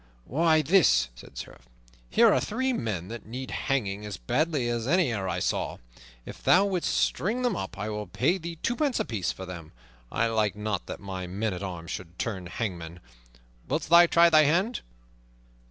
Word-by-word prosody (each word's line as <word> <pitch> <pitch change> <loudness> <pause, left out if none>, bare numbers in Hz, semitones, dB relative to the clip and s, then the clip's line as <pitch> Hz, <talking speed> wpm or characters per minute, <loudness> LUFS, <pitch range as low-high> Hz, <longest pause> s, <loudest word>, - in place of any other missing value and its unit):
"Why, 155 +3 +3
this," 135 - +4
said - - -14
the - - -6
Sheriff. - - -11 0.4
"Here - - +5
are - - +3
three 260 +4 -1
men 105 - -3
that 115 -2 -8
need 130 +3 -6
hanging 105 -7 -1
as 105 -2 -6
badly 145 - 0
as 120 0 -2
any 175 -4 +3
e'er 95 -4 -2
I - - -1
saw. - - -1 0.5
If - - -10
thou 190 +2 +5
wilt 185 -4 -1
string 230 +7 0
them 245 -5 +1
up 95 - -5
I 105 - -3
will 105 -1 -4
pay 160 - +1
thee 170 0 -6
twopence 255 +2 0
apiece 100 -7 -1
for 95 - -8
them. 85 -4 -9 0.4
I - - +1
like 110 -4 +1
not 105 -2 -3
that - - -7
my 95 -2 -5
men 100 +3 -2
at 90 - -6
arms 90 -3 -6
should 85 -1 -7
turn 95 -6 -3
hangmen. 85 -5 -5 0.7
Wilt - - -2
thou 170 +1 +8
try 170 0 +5
thy 155 -1 +7
hand?" 185 - +1
115 Hz, 185 wpm, -27 LUFS, -, 0.7 s, thou